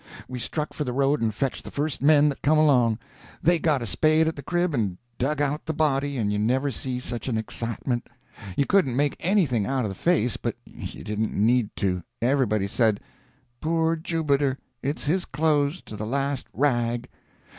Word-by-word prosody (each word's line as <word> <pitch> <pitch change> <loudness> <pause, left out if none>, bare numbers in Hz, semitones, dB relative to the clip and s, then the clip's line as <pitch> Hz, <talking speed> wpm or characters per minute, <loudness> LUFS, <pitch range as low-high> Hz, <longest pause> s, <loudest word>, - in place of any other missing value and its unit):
We 125 -1 -5
struck 150 +5 -3
for 150 - -2
the 125 -3 -3
road 140 +2 +2
and 115 -1 +1
fetched 130 +5 -2
the - - -8
first 145 0 -2
men 150 +1 +6
that 140 - -5
come 155 +3 +3
along. 125 -8 +4 0.5
They 175 +1 +4
got 150 -6 +1
a - - -3
spade 155 +8 +3
at 160 - -1
the 140 - -7
crib 175 +2 0
and 100 -8 -1 0.2
dug 145 +4 0
out 145 +2 -2
the 160 - 0
body, 145 -2 +1
and 105 -3 0
you 105 - 0
never 130 +6 +1
see 125 +1 -3
such 120 -1 -5
an 120 -4 0
excitement. 115 +2 -3 0.5
You 140 - +3
couldn't 165 -10 +3
make 145 +1 +1
anything 160 - +2
out 130 -3 0
of - - -1
the - - -4
face, 135 - +1
but - - -3
you - - -8
didn't 105 +1 -2
need 115 +1 +3
to. 90 -2 0 0.2
Everybody 120 -6 +2
said: 110 0 +2 0.6
"Poor 165 +1 +1
Jubiter; 145 -5 0 0.2
it's 140 +3 -2
his 175 +5 +1
clothes, 150 +3 +1
to 110 - -9
the 105 +1 -4
last 140 +1 -1
rag!" 120 -3 0
135 Hz, 190 wpm, -25 LUFS, 120-150 Hz, 0.6 s, men